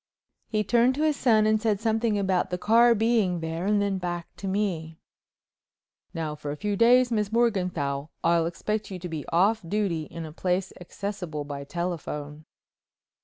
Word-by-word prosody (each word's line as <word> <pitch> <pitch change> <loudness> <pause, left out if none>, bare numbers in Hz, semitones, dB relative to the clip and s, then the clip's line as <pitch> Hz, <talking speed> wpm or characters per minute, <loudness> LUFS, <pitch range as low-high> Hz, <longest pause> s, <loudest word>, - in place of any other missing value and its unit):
He 215 -1 0
turned 240 +5 +3
to 300 - -1
his 310 -1 +2
son 220 -6 +3
and 215 0 +2
said 215 -3 +1
something 220 -1 +1
about 190 -2 +1
"the 180 - -2
car 230 +4 +5
being 220 -5 +2
there," 165 +3 -3
and 210 0 +3
then 200 -1 0
back 175 -2 -5
to 195 - -5
me: 180 -5 -2 1.1
"Now 160 -2 -3
for 150 -1 -7
a 145 - -3
few 205 +5 -2
days, 245 +3 +5
Miss 210 -2 0
Morganthau, 180 -11 0
I'll 170 0 +3
expect 210 +5 -3
you 190 - -5
to 180 0 -6
be 160 -4 -6
off 200 +6 +2
duty 170 -3 -1
in 165 +2 -7
a 155 - -8
place 180 +2 -1
accessible 180 -4 -5
by 140 -1 -6
telephone." 155 -3 -5
190 Hz, 170 wpm, -26 LUFS, 165-215 Hz, 1.1 s, car